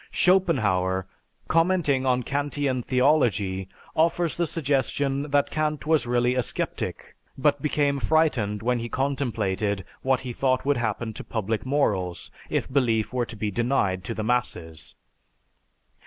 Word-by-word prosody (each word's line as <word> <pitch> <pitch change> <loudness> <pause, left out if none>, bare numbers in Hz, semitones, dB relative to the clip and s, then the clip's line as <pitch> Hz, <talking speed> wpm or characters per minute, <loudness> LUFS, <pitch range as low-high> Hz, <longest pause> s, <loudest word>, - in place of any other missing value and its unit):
Schopenhauer, 100 - +2 0.4
commenting 165 -6 +2
on 125 -1 +2
Kantian 140 -1 -1
theology, 115 -9 +1 0.3
offers 165 +1 +2
the 170 -1 0
suggestion 140 -1 0
that 145 0 +2
Kant 155 -1 -1
was 155 -5 +2
really 120 0 +2
a 125 - +1
sceptic, - - -4 0.2
but 145 0 +2
became 145 -1 +1
frightened 125 -10 +1
when 125 0 +1
he 120 +1 -5
contemplated 110 - -1 0.2
what 130 -1 +1
he 125 -2 -5
thought 130 +1 +1
would 145 -1 +2
happen 110 -1 -2
to - - -7
public 110 +2 -3
morals 100 -11 0 0.2
if - - -1
belief 115 -5 +1
were 125 -2 0
to 120 - -8
be 105 0 -2
denied 110 -5 0
to 115 - -4
the 110 - -3
masses. 90 - -2
125 Hz, 140 wpm, -25 LUFS, 110-145 Hz, 0.4 s, Schopenhauer